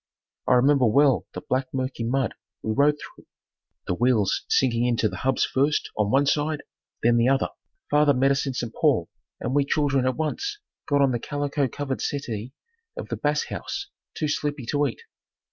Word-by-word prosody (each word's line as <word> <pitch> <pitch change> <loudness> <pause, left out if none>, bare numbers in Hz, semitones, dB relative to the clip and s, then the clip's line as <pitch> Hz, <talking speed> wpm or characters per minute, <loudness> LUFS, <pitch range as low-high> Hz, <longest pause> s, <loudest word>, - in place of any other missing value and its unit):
I - - +5
remember 135 0 +4
well 135 +3 +3
the - - -4
black 130 +1 0
mucky 130 -2 -2
mud 125 +1 0 0.3
we 110 - -1
rode 145 +5 +3
through, - - -13 0.6
the - - -1
wheels 115 -1 +1
sinking 120 -2 +2
in 120 -1 +1
to 110 - +2
the - - -7
hubs 135 0 +1
first 145 +3 0
on 105 -1 +1
one 135 +5 +3
side 150 +1 0 0.4
then 120 +1 +4
the 115 +1 +3
other. 135 +1 +2 0.4
Father 145 -1 +4
met 135 +2 +3
us 140 +1 0
in 130 - -3
St. 120 -2 -3
Paul - - +2 0.3
and - - -3
we 145 0 +4
children 140 -2 +1
at 130 - 0
once 405 - -2 0.3
got 145 -1 +2
on 135 - +3
the 120 - -1
calico 145 +1 -1
covered 135 +1 -4
settee 120 -5 -3 0.5
of - - -6
the - - -2
Bass - - 0
House, 395 +1 -5 0.3
too 155 - -1
sleepy 145 -2 -2
to 145 0 +2
eat. 115 - -7
135 Hz, 190 wpm, -25 LUFS, 125-145 Hz, 0.6 s, I